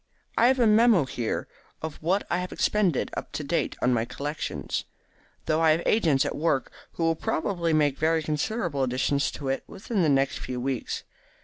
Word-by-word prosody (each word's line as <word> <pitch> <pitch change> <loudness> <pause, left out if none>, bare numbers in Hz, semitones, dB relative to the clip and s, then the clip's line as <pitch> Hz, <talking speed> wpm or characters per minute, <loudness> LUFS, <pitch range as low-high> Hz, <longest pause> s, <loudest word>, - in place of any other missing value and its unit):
I 235 - +5
have 260 +1 +3
a 240 - +5
memo. 215 - +5
here 120 -3 -3 0.4
of 160 -2 -5
what 185 +6 +1
I 175 - 0
have 180 0 -4
expended 195 -9 +1
up - - -5
to - - -3
date - - -1
on 125 - +4
my 115 -2 +1
collection, 140 +6 -5 0.8
though 155 +1 +1
I 160 - +5
have 165 +2 -1
agents 160 -11 +3
at - - -2
work 150 -3 0 0.2
who 170 - -3
will 165 0 +3
probably 170 +1 -1
make 145 -3 +2
very 160 0 +2
considerable 155 - -1
additions 130 +2 +1
to 140 - -6
it 135 - -1
within 200 0 -3
the 160 - +3
next 135 -1 +2
few 125 -1 -4
weeks. 130 0 -3
155 Hz, 190 wpm, -26 LUFS, 135-180 Hz, 0.8 s, I